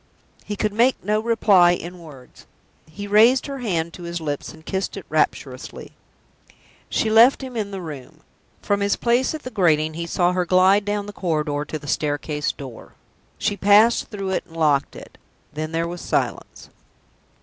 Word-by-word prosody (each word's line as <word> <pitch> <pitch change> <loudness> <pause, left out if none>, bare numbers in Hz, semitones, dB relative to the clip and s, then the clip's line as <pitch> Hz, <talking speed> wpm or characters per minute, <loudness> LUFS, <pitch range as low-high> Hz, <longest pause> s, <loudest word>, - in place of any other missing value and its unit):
He 210 - -5
could 210 0 -1
make 240 +4 +3
no 210 +1 +1
reply 210 -6 +4
in 175 +1 -6
words. 145 -7 -15 0.4
He 205 +6 -7
raised 225 +6 +5
her 275 -1 -6
hand 170 -8 -2
to - - -11
his 170 0 -5
lips, 145 -3 -4
and 160 0 -16
kissed 190 0 -3
it - - -8
rapturously. - - -2 1.0
She 220 - 0
left 235 +5 +6
him 255 -2 -7
in 210 -3 -2
the 195 -2 -6
room. 145 -6 -9 0.4
From 200 0 +1
his 200 0 +1
place 245 +5 +1
at 310 - -8
the 255 - -7
grating 160 -6 +2
he 170 +1 -5
saw 175 +1 +1
her 180 0 0
glide 185 +3 +4
down 205 0 -2
the 205 - -8
corridor 150 -5 -2
to 155 - -5
the 145 - -13
staircase 150 +1 -1
door. 130 -5 -11 0.4
She 205 - -1
passed 205 +4 +4
through 195 -3 -5
it, 190 - -1
and 165 - -13
locked 150 -4 +1
it. - - -13 0.3
Then 155 +1 -4
there 165 +1 -1
was 175 0 -6
silence. - - -3
185 Hz, 180 wpm, -22 LUFS, 160-210 Hz, 1.0 s, left